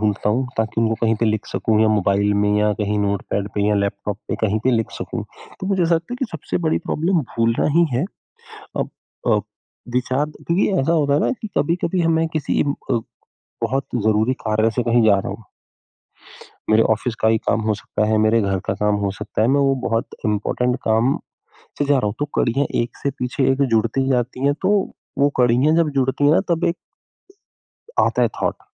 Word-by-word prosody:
ढूँढता 105 -1 0
हूँ 125 +4 0
ताकि 110 0 0
उनको 115 0 +2
कहीं 115 0 +3
पे 115 - +3
लिख 110 -1 -1
सकूँ 110 -1 0
या 110 - +4
मोबाइल 100 -1 +2
में 105 - +2
या 105 0 +2
कहीं 105 0 0
नोटपैड 100 0 -1
पे 105 0 +1
या 105 - +2
लैपटॉप 100 0 -2
पे - - -1
कहीं 105 +1 0
पे 130 - +4
लिख 115 -3 0
सकूँ। - - -4 0.4
तो 190 - -4
मुझे 195 -2 +1
ऐसा 170 0 +3
लगता 165 +8 -3
है - - -3
कि 265 - 0
सबसे 160 - -3
बड़ी 155 - +2
प्रॉब्लम 170 +3 +1
भूलना 115 0 +1
ही 170 - +6
है। 130 +8 +1 0.7
अब - - -1 0.4
अ, - - +4 0.6
विचार 130 +3 +1 0.3
भी 180 - +2
ऐसा 160 +5 +1
होता 145 -3 +2
है 145 - +2
न - - +1
कि 215 - -4
कभी-कभी 170 +4 0
हमें 165 0 +2
किसी 145 - 0
अ, - - -5 1.0
बहुत 135 +1 0 0.2
ज़रूरी 110 +3 +3
कार्य 110 +1 +2
से 125 - +1
कहीं 120 0 +3
जा 100 -2 +6
रहा - - -4
हूँ। 110 +2 -8 1.3
मेरे 110 +1 +5
ऑफ़िस 110 +2 0
का 110 - +3
ही 110 - +3
काम 110 - 0
हो 110 -1 0
सकता 105 +1 -2
है, 110 0 +2
मेरे 110 +1 +3
घर 95 -1 0
का - - 0
काम 105 0 +1
हो 100 - +1
सकता 105 +2 -3
है, 115 - +3
मैं 140 +1 +3
वो 135 -1 +3
बहुत 115 0 0 0.2
इम्पोर्टेंट 115 +4 0
काम 115 +4 +2 0.6
से 145 - +1
जा 145 - +3
रहा 125 -6 +1
हूँ 105 - -2
तो 145 - 0
कड़ियाँ 135 +3 +2 0.2
एक 120 - -7
से 140 - +1
पीछे 130 +1 0
एक 135 +1 0
जुड़ती 115 +4 +1
जाती 125 +1 -1
हैं 145 0 +3
तो 190 - +2 0.5
वो 140 +1 +4
कड़ियाँ 125 +6 +4
जब 165 -2 +3
जुड़ती 135 +2 +2
हैं 180 +4 +4
तब 170 0 +1
एक 170 - +1 1.3
आता - - +2
है - - +4
थॉट - - -2
115 Hz, 205 wpm, -21 LUFS, 110-140 Hz, 1.3 s, ही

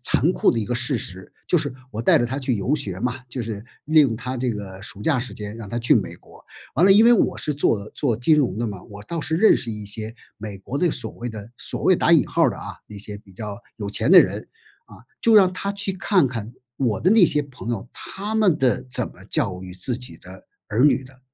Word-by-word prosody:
残 - - +3
酷 - - +3
的 - - -1
一 110 - -1
个 120 +3 -3
事 120 +2 +3
实。 95 -3 -5
就 - - +2
是 - - 0 0.2
我 110 - -4
带 - - +5
着 120 - +1
他 130 +3 -4
去 130 -3 -1
游 115 +9 0
学 95 - -3
嘛， 125 +4 -2
就 125 +1 -5
是 110 -2 -5 0.2
利 155 +1 +5
用 130 -6 +2
他 125 +3 -5
这 125 0 -1
个 100 -3 -7
暑 100 0 -7
假 145 +6 +1
时 125 +1 -3
间 105 0 -7
让 115 -3 -8
他 115 - -3
去 120 +1 +3
美 - - -1
国， - - -19 0.3
完 170 - +3
了 195 - +6
因 210 +3 +6
为 240 - +7
我 225 - +2
是 150 - -1
做 105 -7 0
做 125 -6 -1
金 125 +8 +3
融 135 -9 +1
的 120 - -1
嘛， 100 -4 -7
我 100 -1 -12
倒 165 +9 -4
是 160 +1 -1
认 215 +5 +5
识 115 - -4
一 105 -1 -7
些 110 +2 -3 0.2
美 105 -2 -8
国 110 +8 -6
的 175 +3 +2
所 125 -6 -4
谓 120 - -6
的 110 -2 -8
所 - - -2
谓 - - +5
打 - - +1
引 - - +5
号 - - +2
的 - - -5
啊， - - -8
那 105 - -10
些 105 0 -6
比 100 -1 -18
较 105 +1 -7 0.2
有 105 -3 -5
钱 110 +6 +2
的 185 -1 +10
人， - - -2 0.4
啊， - - -15 0.2
就 230 - +3
让 190 -3 +6
他 200 +2 -3
去 200 -1 -2
看 190 -3 +2
看 115 -3 -6 0.2
我 115 -7 -1
的 180 - +2
那 220 -5 +7
些 150 -3 +3
朋 135 -4 -10
友， 115 0 -4
他 205 +3 -6
们 200 -8 +3
的 130 -2 +1
怎 125 -1 +3
么 95 - -14
教 100 - 0
育 90 - -9
自 105 +7 +2
己 125 +1 -3
的 95 +1 -15 0.2
儿 110 +4 0
女 140 -2 +3
的。 130 0 -18
120 Hz, 280 characters per minute, -22 LUFS, 105-150 Hz, 0.4 s, 的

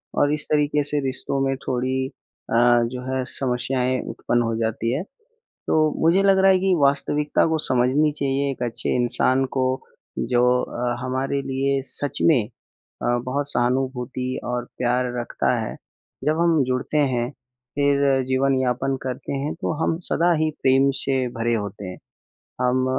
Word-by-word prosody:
और 145 +1 +2
इस 150 -1 -1
तरीके 150 -1 +2
से 145 +1 0
रिश्तों 135 +1 0
में 135 - 0
थोड़ी 130 +1 -1
अ, 135 -4 -13
जो 120 +1 +3
है 130 -1 0
समस्याएँ 130 0 0
उत्पन्न 120 0 -1
हो 115 -1 -1
जाती 115 +1 -1
है। 155 +7 -2 0.6
तो 155 -1 +3
मुझे 170 +4 +4
लग 195 -1 +4
रहा 190 0 +6
है 185 - +3
कि 190 0 +2
वास्तविकता 145 +1 +2
को 160 0 +1
समझनी 130 +5 +2
चाहिए 140 -1 -1
एक 130 - -9
अच्छे 120 0 -2
इंसान 130 +2 +2
को 130 - +2 0.6
जो 120 0 +1 0.2
अ, 120 0 -3
हमारे 130 +2 -1
लिए 135 0 -1
सच 145 -1 +2
में 140 -10 +4 0.6
अ, 120 0 +2
बहुत 140 +2 -1
सहानुभूति 130 0 -1
और 125 0 -2
प्यार 125 0 0
रखता 120 - -1
है। - - -4 0.5
जब 155 +2 +1
हम 165 -4 +3
जुड़ते 130 +4 -2
हैं, 125 -4 +1 0.5
फिर 140 -2 +2
जीवन 135 +1 +2
यापन 130 +2 0
करते 130 +1 -4
हैं 150 - -2
तो - - -1
हम 165 - 0
सदा 175 +2 +2
ही 155 - +1
प्रेम 135 +1 +4
से 130 -2 0
भरे 115 0 +1
होते 100 -2 -5
हैं। 90 - -7 0.7
हम 125 +1 +2
130 Hz, 160 wpm, -23 LUFS, 125-145 Hz, 0.7 s, रहा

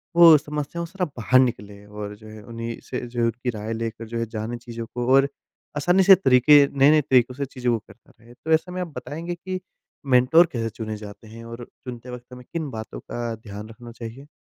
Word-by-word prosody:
वो 170 -2 +9
समस्याओं 150 +3 -4
से 170 +4 -16
ना, 180 - +2
बाहर 125 +2 +4
निकले 105 -5 -1
और 105 0 -7
जो 110 +1 -15
है 110 0 -11
उन्हीं 115 +1 -6
से - - -4
जो 120 0 -2
उनकी 120 +2 -2
राय 110 -1 -4
लेकर 115 0 -4
जो 115 +1 -5
है 115 - 0
जाने 110 +2 -4
चीज़ों 120 -1 -7
को 120 0 -2
और 135 +1 +5 0.5
आसानी 180 +6 +3
से 195 +1 +9
तरीके 145 -3 +6
नए-नए 145 +3 +5
तरीकों 130 -2 +3
से 140 +1 -2
चीज़ों 125 -2 -1
को 115 - 0
करता - - -19
रहे। 120 +1 -17
तो 160 +6 -6
ऐसे 160 +3 +2
में 180 0 -3
आप 180 - -3
बताएँगे 170 +4 -5
कि 185 +2 -5 0.6
मेंटोर 140 +8 +6
कैसे 115 -2 -2
चुने 110 0 -5
जाते 105 +1 -11
हैं 115 +1 -11
और 115 +1 -8 0.2
चुनते 125 -1 -8
वक़्त 125 -1 -8
हमें 125 0 -10
किन 160 -3 -2
बातों 110 -2 -7
का 120 -1 -4
ध्यान 105 -1 -9
रखना 120 +1 -11
चाहिए? 120 +4 -9
120 Hz, 215 wpm, -24 LUFS, 115-145 Hz, 0.6 s, वो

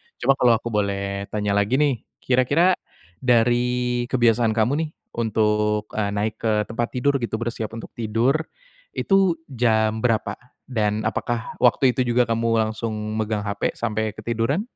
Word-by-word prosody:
Cuma 135 - +2
kalau 120 -2 +5
aku 120 +1 -4
boleh 100 -1 -2
tanya 105 -1 -2
lagi 105 +5 +1
nih 140 -4 +2 0.2
kira-kira 145 +8 +3 0.5
dari 125 0 +2
kebiasaan 120 -2 +2
kamu 115 +4 +2
nih 160 -1 -2 0.3
untuk, 105 -1 +1
eee, 110 -2 -1
naik 110 +1 -2
ke 110 -2 +1
tempat 120 +1 -1
tidur 140 +2 +1
gitu 120 -2 -2
bersiap 115 -1 -3
untuk 115 - -8
tidur, 120 +8 +1 0.5
itu 195 -3 +3 0.2
jam 110 -3 +2
berapa? 115 -2 0 0.3
Dan 105 -3 0
apakah 115 +1 -3
waktu 125 +1 +4
itu 130 - +2
juga 120 -1 +3
kamu 115 0 +2
langsung 110 +1 -3 0.2
megang 110 -1 -1
HP 100 0 -2
sampai 110 -2 -2
ketiduran? 115 - -1
115 Hz, 145 wpm, -23 LUFS, 110-125 Hz, 0.5 s, kalau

